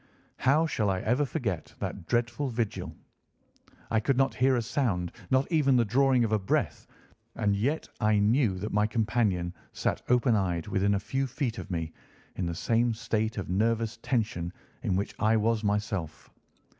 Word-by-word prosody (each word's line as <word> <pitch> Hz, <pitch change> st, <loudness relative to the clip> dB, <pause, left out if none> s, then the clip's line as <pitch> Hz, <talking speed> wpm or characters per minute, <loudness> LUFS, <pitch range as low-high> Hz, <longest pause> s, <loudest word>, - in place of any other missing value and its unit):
How 145 Hz, +5 st, +3 dB
shall 110 Hz, -10 st, 0 dB
I 95 Hz, -1 st, 0 dB
ever 125 Hz, +6 st, +1 dB
forget 120 Hz, -, -3 dB
that 90 Hz, -4 st, -5 dB
dreadful 120 Hz, +4 st, 0 dB
vigil? 115 Hz, -3 st, -3 dB, 1.0 s
I 110 Hz, -, +3 dB
could 130 Hz, +4 st, 0 dB
not 135 Hz, 0 st, +3 dB
hear 130 Hz, +1 st, +3 dB
a 120 Hz, -, +1 dB
sound, 95 Hz, -, -1 dB, 0.2 s
not 130 Hz, +1 st, +3 dB
even 145 Hz, -5 st, +4 dB
the 120 Hz, -2 st, +4 dB
drawing 130 Hz, +2 st, +3 dB
of 110 Hz, -, 0 dB
a 110 Hz, -, +3 dB
breath, 95 Hz, -, -1 dB, 0.5 s
and 105 Hz, -3 st, +1 dB
yet 135 Hz, +10 st, -1 dB
I 105 Hz, -1 st, +3 dB
knew 105 Hz, -1 st, +3 dB
that 105 Hz, +4 st, -4 dB
my 105 Hz, +1 st, +3 dB
companion 105 Hz, -5 st, 0 dB, 0.2 s
sat -, -, -1 dB
open 125 Hz, -1 st, +4 dB
eyed, 90 Hz, -5 st, 0 dB
within 100 Hz, 0 st, +2 dB
a -, -, 0 dB
few 135 Hz, +7 st, -2 dB
feet 125 Hz, -3 st, -3 dB
of 95 Hz, -, -8 dB
me, 80 Hz, -3 st, -3 dB, 0.4 s
in 90 Hz, -, -2 dB
the 85 Hz, -, -3 dB
same 115 Hz, +4 st, +1 dB
state 110 Hz, 0 st, -1 dB
of 100 Hz, -, -3 dB
nervous 115 Hz, +3 st, 0 dB
tension 110 Hz, -9 st, -1 dB, 0.3 s
in 90 Hz, -, 0 dB
which 100 Hz, +2 st, -2 dB
I 110 Hz, +1 st, +3 dB
was 110 Hz, 0 st, +1 dB
myself. 105 Hz, -6 st, -2 dB
110 Hz, 175 wpm, -28 LUFS, 100-125 Hz, 1.0 s, even